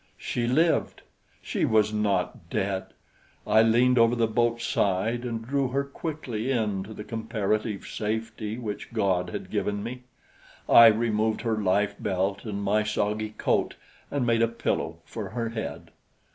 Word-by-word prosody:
She 120 -1 -2
lived! 160 +7 +1 0.4
She - - -2
was 110 -1 +3
not 105 -2 -1
dead! 95 -1 -1 0.6
I 110 - +5
leaned 120 +2 +4
over 115 +1 +5
the 115 -1 +2
boat's 115 +1 0
side 105 +5 0
and 115 -2 -4
drew 140 +2 0
her 135 +3 0
quickly 140 -5 -4
in 110 -6 0
to 110 - -9
the 105 - -7
comparative 110 -2 -2
safety 110 0 -3
which 110 -2 -6
God 95 -5 +1
had - - -6
given 100 0 -1
me. 125 +2 -6 0.7
I 115 - +9
removed 110 -1 +2
her 110 -2 0
life 100 +1 +2
belt 100 +1 -1
and 100 -2 -4
my 105 +2 +2
soggy 105 0 -1
coat - - +1 0.3
and 140 -3 -1
made 115 -1 +2
a 115 - +4
pillow 115 0 -2
for - - -6
her 115 -2 -3
head. 115 -1 -6
110 Hz, 155 wpm, -27 LUFS, 105-120 Hz, 0.7 s, I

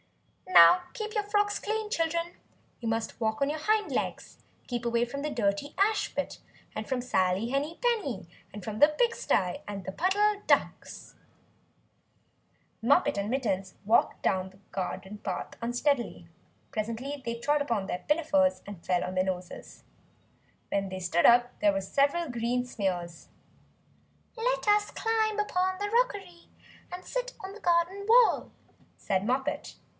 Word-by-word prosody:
"Now 360 - +8
keep 430 -2 -4
your 420 - 0
frocks 410 0 +1
clean, 435 0 -2
children! 335 -1 -1 0.5
You 230 - -4
must 225 +1 -3
walk 220 +3 0
on 275 - +2
your 310 - -4
hind 425 +6 +1
legs. - - -3 0.3
Keep 240 -2 -3
away 235 0 +2
from 280 +4 -6
the 300 - -2
dirty 220 +3 -1
ash 420 +2 +1
pit, - - -3 0.4
and 215 0 -5
from 260 -2 0
Sally 190 -2 +1
Henny 285 +5 -2
Penny, 335 - 0 0.2
and 205 -1 -9
from 215 +1 -5
the 295 - +8
pig 465 +10 +1
stye 180 -2 0
and 200 -2 -6
the - - -4
Puddle 405 - +1
Ducks." - - 0 1.7
Moppet 235 -2 +3
and 200 +1 -1
Mittens 195 -8 -1
walked 225 +3 +2
down 190 0 +1
the 190 - -20
garden 190 +2 -5
path - - -4
unsteadily. 240 - -1 0.4
Presently 230 +6 -4
they 235 -1 -3
trod 290 +5 +1
upon 230 -8 -1
their 180 -1 -4
pinafores 290 -3 +2
and 200 -4 -9
fell 180 -1 +1
on 185 - -4
their 185 - +3
noses. 180 -1 -6 0.9
When 195 -1 -1
they 190 0 -5
stood 175 -1 +3
up 245 +1 +4
there 205 -1 +4
were 195 - -1
several 285 - +1
green 245 +1 -1
smears! 180 -7 -4 1.1
"Let - - -1
us 415 0 +4
climb 440 -1 0
up 420 - 0 0.3
the 410 0 -2
rockery, 405 -8 -1 0.4
and 360 +1 -7
sit - - -3
on 380 +1 -6
the 430 - -12
garden 350 +3 +1
wall," 485 0 +5 0.5
said 190 -1 -1
Moppet. 265 +5 -2
260 Hz, 155 wpm, -29 LUFS, -, 1.7 s, Now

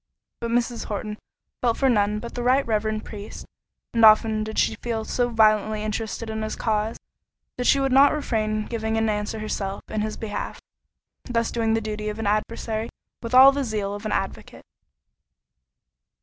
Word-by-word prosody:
But 235 - -3
Mrs. 240 0 0
Horton 210 0 -5 0.4
felt 235 -2 +1
for 270 - +2
none 210 -4 +2
but 235 +2 -8
the 245 - -4
right 255 +3 +3
reverend 215 -1 -1
priest; 210 -1 -8 0.5
and 230 -1 +2
often 215 0 +6
did 220 0 -6
she - - +3
feel 225 -2 -3
so 245 +1 0
violently 215 -1 +3
interested 220 +1 -3
in 220 0 -4
his 215 0 -3
cause, 215 0 -1 0.6
that 245 - -1
she - - +5
could 270 -1 +1
not 275 +2 +6
refrain 215 -7 -1
giving 220 -1 -2
an 225 0 +1
answer 210 +1 -2
herself 200 -2 -4
in 215 - -2
his 215 0 -3
behalf—thus 230 +2 -6
doing 225 -1 +1
the 225 - 0
duty 215 0 -4
of 210 - -5
an 225 - -4
adversary 220 +2 -1 0.3
with 230 +1 -2
all 265 +2 +10
the 280 0 -2
zeal 210 -4 -2
of 205 +1 -5
an - - -3
advocate. 195 -1 -4
220 Hz, 175 wpm, -24 LUFS, 215-235 Hz, 0.6 s, all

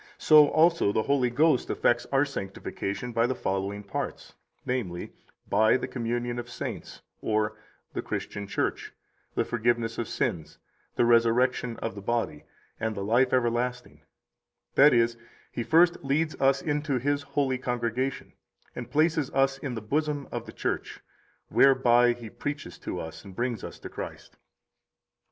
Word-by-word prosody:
so 150 -1 +7
also 165 -9 +4
the 110 - +1
Holy 135 -2 +2
Ghost 145 +2 +2
effects 120 0 +1
our 135 +1 +4
sanctification 100 -1 -5
by 115 +1 +2
the 130 - -1
following 100 +1 -2
parts, 100 - -5 0.3
namely, 100 -9 -3 0.3
by 110 +4 +4
the - - -4
communion 120 0 -2
of 120 0 -7
saints 125 - -6 0.2
or 110 0 0 0.4
the - - -2
Christian 100 0 -5
Church, - - -2 0.4
the - - +1
forgiveness 120 -1 0
of 115 - -2
sins, 80 -3 -2 0.4
the 120 - +3
resurrection 120 +1 +3
of 115 - -2
the 100 - -8
body, 100 -9 -2 0.3
and 110 -1 -2
the 100 - -4
life 120 +5 +3
everlasting; 125 0 -1 0.7
that 145 +2 +7
is, 115 0 +2 0.3
He - - -3
first 170 +7 +4
leads 155 +3 +1
us 135 0 +3
into 145 -2 0
His 145 +3 0
holy 140 -3 -1
congregation, 125 +1 -2 0.4
and - - -6
places 155 0 +2
us 135 0 +2
in 130 -4 -4
the 110 - -4
bosom 145 +4 -1
of - - -5
the - - -7
Church, - - -3 0.5
whereby 120 -3 +5
He 120 -1 -9
preaches 145 +6 -6
to - - -5
us - - -7
and 95 -1 -12
brings 120 -2 -2
us - - -7
to - - -9
Christ. - - -8
120 Hz, 150 wpm, -27 LUFS, 115-135 Hz, 0.7 s, so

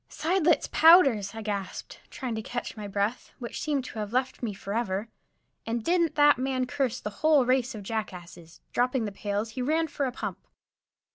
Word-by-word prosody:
"Seidlitz 335 -1 +1
powders!" 270 - +6
I 225 - -6
gasped, 200 -3 -5
trying 255 -4 -5
to 220 - -3
catch 245 +3 -5
my 210 -2 -6
breath, 200 +4 -2
which 240 -2 -6
seemed 285 -4 -1
to 225 - -7
have 210 -1 -4
left 255 +1 -1
me 235 -4 -2
forever. 200 +1 -3 0.6
And 230 0 -2
didn't 335 -1 +1
that 290 -3 +5
man 260 -1 0
curse 255 -2 -1
the 210 - -5
whole 305 -4 +5
race 255 -1 +1
of 210 - -7
jackasses! 180 -5 -6
Dropping 250 -1 +1
the 205 - -4
pails, 205 +2 -3
he 250 - -5
ran 315 +5 +1
for 285 -2 -2
a - - -3
pump. 245 - -6
245 Hz, 185 wpm, -27 LUFS, 210-275 Hz, 0.6 s, powders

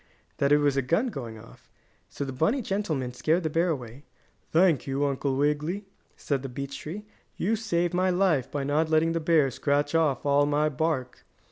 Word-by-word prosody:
that 140 0 +1
it 145 - +7
was 145 -2 +2
a 135 - +2
gun 170 - +1
going 120 - -7
off. 115 +1 -16 0.4
So 140 - -5
the 135 - -5
bunny 215 - +1
gentleman 160 -12 -2
scared 160 +7 +1
the 155 - -1
bear 170 +3 +2
away. 130 -3 -5 0.5
"Thank 165 -5 +3
you, 135 +1 0
Uncle 140 -1 -1
Wiggily," 150 +7 0 0.3
said 140 -3 -2
the 135 - -6
beech 140 +2 -6
tree. 200 +8 -7 0.3
"You 215 +5 +1
saved 175 -6 -1
my 185 +1 +2
life 175 -8 +2
by 145 -1 -3
not 150 +3 +1
letting 160 +1 +3
the 165 - 0
bear 155 -4 +3
scratch 145 +3 0
off 155 -6 +1
all 145 0 +3
my 150 +1 +2
bark." 145 -3 -2
150 Hz, 195 wpm, -27 LUFS, 135-170 Hz, 0.5 s, it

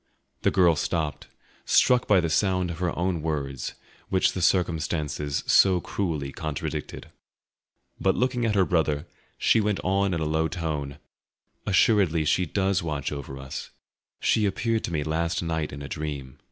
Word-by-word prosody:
The - - +3
girl 85 -3 +4
stopped, 75 -2 -2 0.4
struck 125 -1 +4
by 100 -3 +5
the 85 -2 0
sound 90 0 +1
of 85 - -7
her 90 -2 -1
own 90 -1 0
words, 70 -4 -3 0.3
which 95 - +3
the 95 - -3
circumstances 80 -5 0
so 95 -2 +5
cruelly 80 -7 -3
contradicted. 75 -2 -5 0.9
But 95 - +2
looking 125 0 0
at 110 -2 +1
her 95 -2 +4
brother, 75 -4 0 0.3
she 110 - +3
went 105 -1 0
on 95 0 +1
in - - -1
a 80 - -1
low 80 +1 +1
tone: 75 -5 -4 0.7
"Assuredly 95 -5 +3
she 90 +3 +2
does 95 +2 +1
watch 75 -4 -3
over 70 -2 -6
us. 65 0 -7 0.5
She 105 -2 +2
appeared 115 +3 -1
to - - -5
me 75 -3 -1
last 85 +3 -1
night 80 -2 -2
in 70 +1 -7
a - - -5
dream. 70 -4 -5
85 Hz, 160 wpm, -26 LUFS, 75-95 Hz, 0.9 s, by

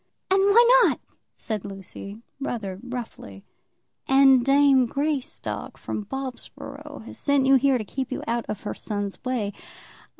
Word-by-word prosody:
"And 385 - +5
why 470 +5 +6
not?" - - +2 0.4
said 215 -4 -4
Lucy, 200 +2 -9 0.2
rather 210 -9 -4
roughly. 235 - -8 0.6
"And 270 -2 +6
dame 275 -1 +5
Greystock, 285 +1 -3
from 210 - -5
Bobsborough, 265 +1 -8
has - - -9
sent 280 -2 +2
you 270 - +5
here 270 0 +4
to 220 - -5
keep 260 +5 -4
you 260 - -3
out 235 0 -2
of 205 - -4
her - - -3
son's 205 0 -4
way. 240 -6 -2
255 Hz, 140 wpm, -25 LUFS, 210-275 Hz, 0.6 s, why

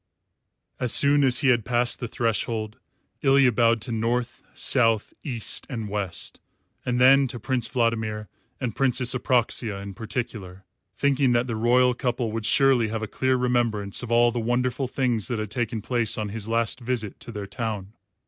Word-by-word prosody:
As 125 -3 +2
soon 145 0 +5
as 130 -2 +4
he 140 - +3
had 120 -3 +3
passed 120 +1 0
the 120 - -4
threshold, 115 0 -2 0.4
Ilya 135 -2 +4
bowed 115 0 +2
to 120 - -4
North, 120 +2 -2
South, 115 -5 +1
East, 120 -8 -2
and 115 -6 -5
West, 100 -4 -4 0.4
and 125 -1 -1
then 135 +2 +6
to 120 -1 -7
Prince 125 +2 -1
Vladimir 110 -3 -1 0.3
and 125 -5 -3
Princess 125 -2 +2
Apraxia 120 -4 0
in 100 0 -7
particular, 100 -3 -6 0.3
thinking 140 -2 +2
that 120 +1 +2
the 120 -3 -3
royal 125 +3 +3
couple 120 -2 -2
would 110 0 -2
surely 135 -5 +4
have 110 +1 -4
a - - -3
clear 130 +4 0
remembrance 120 -5 0
of 120 -2 -7
all 120 0 +4
the 120 - -3
wonderful 125 +3 -1
things 125 -5 0
that 120 - -2
had 110 -1 -4
taken 115 -3 -2
place 120 -3 0
on 105 -1 -3
his 110 +1 -5
last 115 +1 0
visit 120 -4 -3
to - - -9
their 105 -3 -6
town. 105 -1 -5
120 Hz, 175 wpm, -25 LUFS, 110-125 Hz, 0.4 s, then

